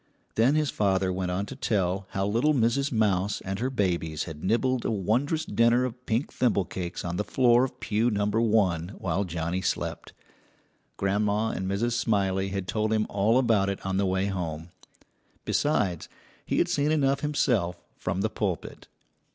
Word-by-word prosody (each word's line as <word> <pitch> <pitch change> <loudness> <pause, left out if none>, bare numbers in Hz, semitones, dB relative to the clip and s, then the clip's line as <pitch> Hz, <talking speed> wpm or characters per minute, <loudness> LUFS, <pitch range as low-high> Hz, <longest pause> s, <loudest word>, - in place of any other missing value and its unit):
Then 120 +6 +3
his 155 -2 +1
father 95 -2 +1
went 90 0 -2
on 95 +3 -1
to 135 - -8
tell 95 -6 -1
how 95 -1 -1
little 120 +9 +2
Mrs. 130 +3 +1
Mouse 105 -3 +1
and 95 +1 -4
her 125 +3 0
babies 85 - -1
had 80 -3 -8
nibbled 120 +5 +1
a - - -1
wondrous 115 - 0
dinner 120 +2 +3
of 125 0 -7
pink 115 +6 -1
thimble 110 -7 +1
cakes 90 -1 -5
on 85 0 -3
the 105 - 0
floor 120 +1 +4
of 130 - -4
pew 110 +2 +1
number 105 +1 +1
one 100 -5 +1
while 95 +2 -1
Johnnie 85 +1 -2
slept. - - -3 0.8
Grandma 105 +2 +1
and 95 -2 -3
Mrs. 110 +5 0
Smiley 95 -4 +1
had 95 -1 -4
told 110 +2 0
him 110 -1 +2
all 105 +4 +3
about 110 -6 +3
it 100 - -3
on 95 0 -1
the 100 0 +2
way 95 +1 +1
home; 85 -4 -4 0.8
besides, 95 - 0 0.4
he - - 0
had - - +3
seen 145 +1 +1
enough 140 -3 +2
himself 120 -12 0 0.2
from 90 +1 -2
the 110 - +1
pulpit. 100 -6 -4
105 Hz, 175 wpm, -27 LUFS, 95-120 Hz, 0.8 s, floor